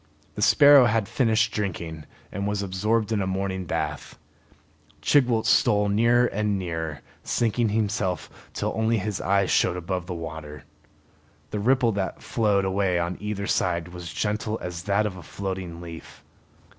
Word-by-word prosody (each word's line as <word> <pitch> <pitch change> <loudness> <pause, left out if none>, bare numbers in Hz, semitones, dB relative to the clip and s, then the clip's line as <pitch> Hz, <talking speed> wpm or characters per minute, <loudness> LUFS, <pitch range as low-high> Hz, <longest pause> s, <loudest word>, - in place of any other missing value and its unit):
The 105 - -6
sparrow 145 +2 +7
had 115 -3 +1
finished 115 -2 +2
drinking 85 -6 -4 0.3
and 100 +1 -3
was 105 -1 -1
absorbed 105 +4 0
in 105 -2 +1
a 95 - -1
morning 95 -1 -2
bath. - - -4 0.9
Chigwooltz 120 -6 +3
stole 105 0 +3
nearer 120 +4 +4
and 105 -3 -1
nearer, 80 -5 -4 0.2
sinking 115 0 0
himself 105 -5 -1 0.2
till - - -2
only 110 +1 +1
his 105 -1 -3
eyes 100 0 +2
showed 90 - +2
above 90 +1 -4
water. 80 -3 -7 0.9
The 105 - -2
ripple 125 +2 +3
that 100 -2 -3
flowed 105 -4 +1
away 95 -1 +1
on 85 +1 -1
either 105 -1 -3
side 85 -3 0
was 90 -2 -8
gentle 105 +4 -2
as 90 -1 -5
that 100 +1 +2
of 95 -3 -4
a - - -9
floating 95 -3 -5
leaf. 85 -1 -10
100 Hz, 150 wpm, -25 LUFS, 90-110 Hz, 0.9 s, sparrow